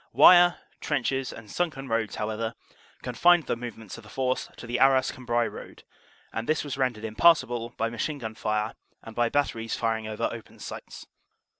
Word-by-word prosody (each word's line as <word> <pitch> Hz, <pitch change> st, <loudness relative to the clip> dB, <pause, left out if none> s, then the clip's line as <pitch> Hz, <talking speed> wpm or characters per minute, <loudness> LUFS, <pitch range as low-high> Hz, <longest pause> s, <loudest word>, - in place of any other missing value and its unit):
Wire, 175 Hz, -1 st, +8 dB, 0.2 s
trenches 135 Hz, -2 st, -1 dB
and 110 Hz, -2 st, -11 dB
sunken 150 Hz, -6 st, -2 dB
roads, 115 Hz, -2 st, -1 dB
however, 110 Hz, +1 st, -3 dB, 0.5 s
confined 170 Hz, +7 st, +4 dB
the -, -, -1 dB
movements 115 Hz, -4 st, -8 dB
of -, -, -14 dB
the -, -, -14 dB
force 130 Hz, -1 st, -1 dB
to -, -, -9 dB
the 120 Hz, +1 st, -2 dB
Arras 135 Hz, -1 st, +4 dB
Cambrai 120 Hz, -2 st, 0 dB
road; -, -, -9 dB, 0.5 s
and 115 Hz, +4 st, -4 dB
this 155 Hz, -, +2 dB
was 145 Hz, -2 st, -4 dB
rendered 125 Hz, -5 st, -1 dB
impassable 120 Hz, -1 st, +3 dB
by 115 Hz, -, +1 dB
machine 145 Hz, +6 st, -2 dB
gun 110 Hz, -5 st, -6 dB
fire 105 Hz, 0 st, -1 dB, 0.3 s
and 115 Hz, -, -10 dB
by 120 Hz, -1 st, +2 dB
bat 145 Hz, +2 st, +2 dB
teries 115 Hz, 0 st, -4 dB
firing 110 Hz, -1 st, -1 dB
over 110 Hz, 0 st, -1 dB
open -, -, -10 dB
sights. -, -, -9 dB
120 Hz, 175 wpm, -27 LUFS, 115-135 Hz, 0.5 s, Wire